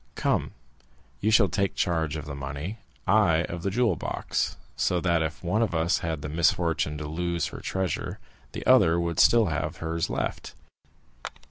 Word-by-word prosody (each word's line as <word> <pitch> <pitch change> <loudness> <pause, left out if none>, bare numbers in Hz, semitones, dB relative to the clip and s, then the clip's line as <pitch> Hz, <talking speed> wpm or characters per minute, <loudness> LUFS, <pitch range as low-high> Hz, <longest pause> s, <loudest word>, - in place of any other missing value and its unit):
Come, - - 0 0.7
you 105 - +1
shall 110 -3 +5
take 100 0 -1
charge 80 -3 0
of 75 -1 -5
the 75 - -6
money, 70 +9 -5 0.3
I 85 -7 +4
of 85 -1 -5
the 100 - -1
jewel 110 -2 +2
box; - - -2 0.2
so 90 - +1
that 85 -2 +1
if 80 +2 -3
one 95 +6 +1
of 110 -7 0
us 80 +3 +2
had 80 -3 -3
the - - -3
misfortune 80 -1 +1
to 75 0 -5
lose 85 +1 -2
her - - -8
treasure, 95 -2 -3 0.4
the - - -6
other 80 +1 +5
would 85 -2 -1
still 115 -2 +6
have 80 - -3
hers 80 +1 -2
left. - - -3
85 Hz, 170 wpm, -27 LUFS, 80-95 Hz, 0.7 s, still